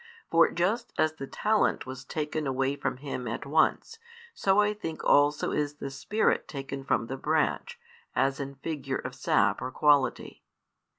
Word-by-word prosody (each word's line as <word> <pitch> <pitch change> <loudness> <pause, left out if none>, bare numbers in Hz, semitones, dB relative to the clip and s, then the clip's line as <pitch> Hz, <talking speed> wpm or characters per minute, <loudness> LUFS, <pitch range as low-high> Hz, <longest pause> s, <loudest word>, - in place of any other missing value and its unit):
For 165 0 +6
just 210 +8 -1
as 155 0 +2
the 135 -3 -7
talent 215 +7 +1
was 130 0 -7
taken 150 +1 -3
away 135 +1 0
from 135 -3 -3
him 130 -2 -5
at 115 - -4
once, 160 - +1 0.3
so 195 - +2
I 210 0 +3
think 165 -7 -6
also 145 +1 +3
is 145 -1 -1
the 140 -2 -6
Spirit 210 +11 0
taken 135 -1 -6
from 135 - 0
the 135 +3 -5
branch, 160 - 0 0.4
as 135 +1 +1
in 140 0 -5
figure 145 0 -4
of - - -6
sap - - +1
or 130 - -3
quality. 145 0 +2
145 Hz, 165 wpm, -28 LUFS, 135-165 Hz, 0.4 s, For